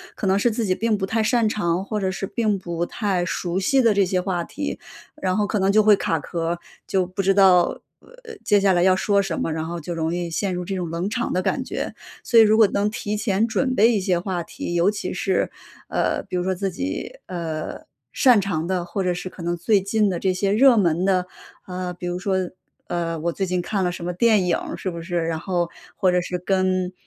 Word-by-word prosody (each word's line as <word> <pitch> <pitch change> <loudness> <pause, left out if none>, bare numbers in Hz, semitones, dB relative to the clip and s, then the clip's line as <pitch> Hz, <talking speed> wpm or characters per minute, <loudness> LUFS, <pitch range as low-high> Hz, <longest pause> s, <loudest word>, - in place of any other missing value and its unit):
可 - - -4
能 190 0 +3
是 240 - +3
自 225 0 -1
己 185 - +2
并 220 +2 0
不 190 - -1
太 225 +3 0
擅 230 +1 +2
长， 190 -3 -1
或 210 +1 -2
者 190 - 0
是 190 +1 -3
并 210 +1 0
不 170 -2 -3
太 195 -5 -1
熟 175 +1 -2
悉 260 +7 +3
的 230 -2 +5
这 200 0 +3
些 185 0 0
话 180 -2 -1
题， 290 - -5 0.4
然 185 -4 0
后 210 - +2
可 210 0 -1
能 190 +1 +3
就 215 +1 +5
会 210 0 +7
卡 165 - -1
壳， 165 +3 -3 0.3
就 190 -1 +1
不 185 +2 -3
知 195 0 +2
道 185 -3 +5 0.6
接 205 -1 +4
下 195 -1 +3
来 175 -1 +3
要 185 0 +5
说 200 +1 +2
什 190 -4 -3
么， - - -1
然 160 0 -3
后 170 +1 -4
就 170 +2 -5
容 160 0 -1
易 175 -1 -2
陷 185 +3 -1
入 180 - -3
这 195 +2 -4
种 180 -3 -3
冷 170 +4 -2
场 240 +2 -2
的 185 - +1
感 260 - -1
觉。 - - -4 0.3
所 235 - +5
以 225 - +9
如 215 0 +4
果 220 -2 +7
能 200 +1 0
提 210 -1 -3
前 205 +1 +1
准 260 +3 0
备 230 0 +5
一 215 - +1
些 185 -2 +1
话 175 -1 -3
题， 175 - -6
尤 175 +4 +3
其 200 -3 -4
是， 190 0 0 0.4
呃， - - 0
比 - - -6
如 180 - 0
说 190 0 0
自 195 +1 -2
己， 275 - -4
呃， 165 -3 -5 0.3
擅 250 -5 +5
长 175 -4 -2
的， 185 -2 -1
或 190 +2 -3
者 180 - +1
是 180 +1 -5
可 180 - -12
能 175 +1 -2
最 195 +3 +2
近 210 +2 +1
的 180 -3 -2
这 190 +1 +1
些 195 +2 0
热 245 +4 +6
门 175 -3 +2
的， 185 -2 +2 0.4
啊。 180 -1 -5
比 175 0 -8
如 175 0 -2
说， 195 0 -1 0.5
呃， 165 -1 -2
我 170 +1 0
最 195 - -3
近 180 0 0
看 190 +2 -1
了 180 - +1
什 175 -1 -7
么 180 - -2
电 210 0 +3
影 180 - +2 0.2
是 185 - -3
不 170 - -6
是？ 175 +1 -5
然 165 -1 -2
后 175 -1 -1 0.3
或 190 -3 +2
者 180 0 +2
是 180 0 -3
跟 185 0 0
185 Hz, 260 characters per minute, -23 LUFS, 175-205 Hz, 0.6 s, 以